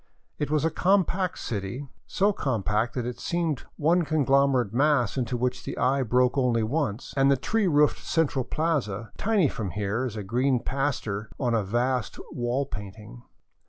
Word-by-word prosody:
It 145 - -1
was 155 0 +1
a 165 - +1
compact 185 -1 +1
city, 110 +6 -4 0.2
so 200 +2 +2
compact 110 - -1
that 125 -3 -2
it 125 0 -5
seemed 165 -5 -1
one 170 +3 +3
con 155 -2 0
glomerate 135 -5 +3
mass 135 -4 +2
into 125 -2 -1
which 125 +1 -1
the - - -5
eye 135 +3 +2
broke 125 +2 +2
only 120 -3 +2
once, 120 -2 -2
— - - -12
at 135 0 +4
the 140 - +4
tree 215 - 0
roofed 150 -3 +3
central 150 -5 +1
plaza, 125 -10 -2
tiny 205 -7 +3
from 110 -6 -4
here 105 +6 -2
as 120 -4 -4
a 105 - -4
green 125 +5 +1
paster 115 -6 -2
on 125 -3 0
a 115 - +2
vast 120 +4 -1
wall 125 +3 -1
painting. 105 - -9
130 Hz, 175 wpm, -26 LUFS, 115-150 Hz, 0.2 s, at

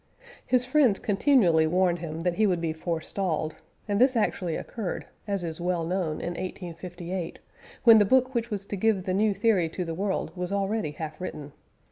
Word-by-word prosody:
His 250 -1 +3
friends 255 -6 +4
continually 195 - +3
warned 175 +1 +2
him 165 -1 -5
that 175 +1 +1
he 215 +4 +2
would 180 -3 +1
be 165 -1 -1
forestalled, 160 0 -2 0.3
and 205 +1 +1
this 260 0 +5
actually 180 -6 0
occurred, 215 -7 -4 0.2
as 200 -3 -1
is 165 0 -4
well 175 -2 0
known, 170 -3 -1
in - - -3
1858, 175 0 -6 0.5
when 230 -3 +9
the - - +6
book 255 +5 +3
which 235 -1 -1
was 200 -3 -4
to 205 - -4
give 200 -1 +1
the 185 -1 -1
new 205 +1 +2
theory 195 -5 +2
to 180 +2 -4
the 165 - -4
world 195 +3 -2
was 180 0 -4
already 200 -2 0
half 155 +2 -7
written. 150 -5 -6
185 Hz, 185 wpm, -27 LUFS, 170-210 Hz, 0.5 s, when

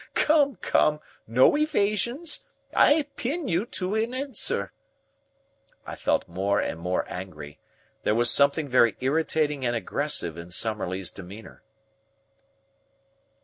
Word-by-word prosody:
Come, 290 -4 +3
come, 150 -4 +1 0.3
no 120 - +4
evasion! 240 - +1 0.5
I 300 +1 +5
pin 295 +6 -2
you 180 +5 0
to 185 -2 -3
an 225 +3 -1
answer!" 255 - 0 1.1
I - - -7
felt - - 0
more 95 +4 0
and 80 - -3
more 90 +2 -1
angry. 75 -6 -8 0.4
There 105 - +1
was 120 +1 +4
something 140 +2 +3
very 120 -4 +3
irritating 150 +1 0
and 120 -1 0
aggressive 85 -5 -2
in 85 +1 -9
Summerlee's 95 -3 -2
demeanour. 100 +3 -11
130 Hz, 115 wpm, -26 LUFS, -, 1.1 s, I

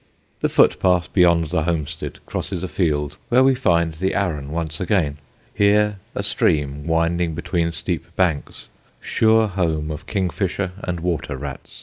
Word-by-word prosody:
The - - +1
footpath 90 -2 +3
beyond 85 -4 +4
the 80 -3 0
homestead 80 -3 -3
crosses 95 -2 -4
a - - -1
field 75 -6 -1
where 125 +2 +5
we 135 0 +5
find 85 -10 +1
the 95 +5 -1
Arun 80 -8 -1
once 80 -1 -3
again 85 -7 0 0.3
here 105 0 +3 0.2
a - - -2
stream 75 0 0
winding 85 0 +1
between 85 +1 -1
steep 80 - -2
banks, 85 -6 -1 0.3
sure 110 0 +3
home 80 -5 -1
of 75 +1 -7
kingfisher 95 -1 -1
and 90 -2 -3
water 80 -5 -2
rats. - - -7
85 Hz, 145 wpm, -21 LUFS, 75-95 Hz, 0.3 s, where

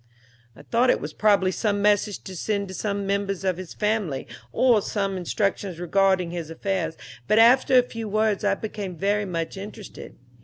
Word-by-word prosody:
"I 145 - -14
thought 240 +9 +2
it - - +3
was 150 +1 -6
probably 200 -2 +3
some 205 +1 -1
message 205 0 +1
to 190 - -8
send 200 +2 -2
to - - -7
some 200 0 -2
members 195 -1 -1
of 185 -2 0
his 185 -2 -8
family, 210 -10 -1 0.3
or 240 -5 +4
some 195 -1 -2
instructions 190 0 -2
regarding 185 0 +2
his 170 -3 -5
affairs, 175 -1 -2 0.3
but 215 - +3
after 250 +3 +6
a 250 - +6
few 230 -3 -6
words 215 0 +1
I 200 -1 +2
became 205 -3 -6
very 205 +3 0
much 170 0 -4
interested. 205 +1 -9
200 Hz, 180 wpm, -24 LUFS, 185-210 Hz, 0.3 s, after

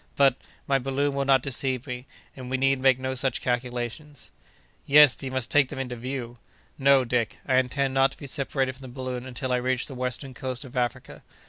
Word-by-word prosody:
But, 135 -3 +5 0.3
my 135 -1 +2
balloon 135 +2 -1
will 140 0 -1
not 135 -2 +4
deceive 130 -1 -1
me, 125 -1 -6 0.3
and 130 -2 -8
we 130 - 0
need 135 0 +2
make 130 -1 +4
no 130 0 -3
such 130 +1 0
calculations." 125 +3 -4 0.6
"Yes, 145 -2 +7
but - - -19
you - - -3
must 130 -2 -1
take 145 -3 +4
them - - -7
into 125 -2 -4
view." 120 -1 -6 0.4
"No, 135 -1 +5
Dick. 115 -3 -1
I 130 - +3
intend 130 +1 +1
not 135 0 +3
to - - -14
be - - -9
separated 135 -1 -1
from 130 - -17
the 130 - -8
balloon 130 0 -5
until 130 0 -4
I - - +3
reach 130 0 0
the 135 - -9
western 125 +1 -4
coast 130 0 -5
of 130 +1 -12
Africa. 125 0 -3
130 Hz, 215 wpm, -26 LUFS, 125-135 Hz, 0.6 s, Yes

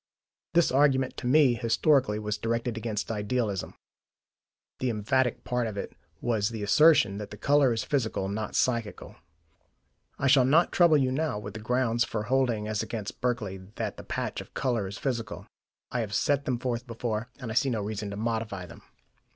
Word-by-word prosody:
This 170 - +4
argument, 135 -1 +3
to 125 - -4
me 135 -1 +5
historically, 120 0 +2
was 105 0 -3
directed 115 +1 -1
against 110 -1 -3
idealism: 105 -2 -2 1.0
the 130 - 0
emphatic 120 +3 0
part 125 -1 -1
of 105 -2 -6
it - - -5 0.3
was 110 -4 +1
the 110 -3 -5
assertion 135 -4 +5
that 105 - -6
the - - -9
colour 145 -2 +3
is 115 -1 -1
physical, 110 -8 -1
not 105 +2 -4
psychical. 115 -4 -1 1.0
I - - -2
shall 135 -1 +6
not 155 +7 +4
trouble 170 -4 +5
you 130 -2 +1
now 150 -4 -1
with 105 0 -7
the 110 - -6
grounds 120 +1 +1
for 110 -2 -3
holding 120 -3 +1
as 110 -1 -1
against 105 -3 -6
Berkeley 115 -6 -1 0.2
that - - -3
the - - -8
patch - - -3
of - - -15
colour 120 -7 0
is 100 - -7
physical; 120 -6 -3 0.5
I 125 - -1
have 105 -3 -2
set 140 +4 +1
them 125 -3 0
forth 120 0 -3
before, 115 -1 -3
and 120 -4 -5
I - - -3
see 135 +4 +2
no 115 -4 -1
reason 105 0 -4
to 100 - -5
modify 110 -4 -2
them. 85 - -13
115 Hz, 185 wpm, -28 LUFS, 105-130 Hz, 1.0 s, shall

